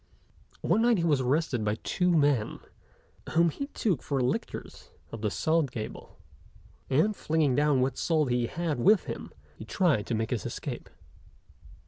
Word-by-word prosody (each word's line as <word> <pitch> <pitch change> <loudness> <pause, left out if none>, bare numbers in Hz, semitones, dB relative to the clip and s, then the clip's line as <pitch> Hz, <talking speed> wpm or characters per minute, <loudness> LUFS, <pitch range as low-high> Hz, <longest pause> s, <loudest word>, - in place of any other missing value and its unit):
One 225 - +2
night 235 -1 +4
he 170 - 0
was 150 -5 +2
arrested 130 -2 0
by 105 0 0
two 180 -1 +1
men, 145 -9 +2 0.8
whom 170 0 +4
he 280 - -5
took 200 - -1
for 140 -2 -2
lictors 125 0 -3 0.2
of 115 - -7
the 110 - 0
Salt 155 +5 +1
Gabelle; 110 -3 -7 0.7
and, 160 +11 +2
flinging 155 -6 +1
down 145 -1 +3
what 130 +1 -1
salt 155 -6 +1
he 120 -1 +1
had 165 -4 -2
with 205 - +5
him, - - -7 0.2
he - - -9
tried 160 - +1
to 120 - -1
make 110 0 -2
his 115 -6 -1
escape. - - -6
145 Hz, 160 wpm, -28 LUFS, 125-170 Hz, 0.8 s, with